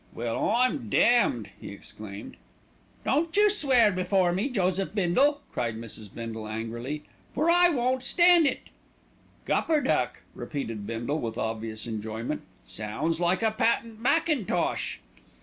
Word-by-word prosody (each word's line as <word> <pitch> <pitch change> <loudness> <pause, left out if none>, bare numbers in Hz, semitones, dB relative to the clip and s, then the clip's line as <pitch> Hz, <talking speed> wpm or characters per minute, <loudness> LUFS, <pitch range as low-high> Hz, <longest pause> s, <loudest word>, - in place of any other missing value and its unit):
"Well, 115 -1 -1
I'm 245 +1 +1
damned!" 120 - +3
he - - -7
exclaimed. 100 0 -9 0.7
"Don't 325 +5 +1
you 415 0 +6
swear 260 - +4
before 185 -1 +2
me, 195 +10 -1
Joseph 190 -3 -1
Bindle," 265 +10 +2
cried 115 -2 -2
Mrs. 110 -3 -9
Bindle 115 -2 -6
angrily; 115 +7 -5 0.3
"for 315 +5 +3
I 350 0 +6
won't 255 -3 0
stand 345 +3 +5
it." 265 - -4 0.7
"Gupperduck!" 310 -3 +1
repeated 115 -8 -5
Bindle 120 +7 -2
with 115 -3 -4
obvious 110 -1 -3
enjoyment. 110 +4 -4 0.2
"Sounds 140 +11 -3
like 175 +5 +1
a 220 - +3
patent 225 0 0
mackintosh." 265 - 0
180 Hz, 125 wpm, -27 LUFS, -, 0.7 s, you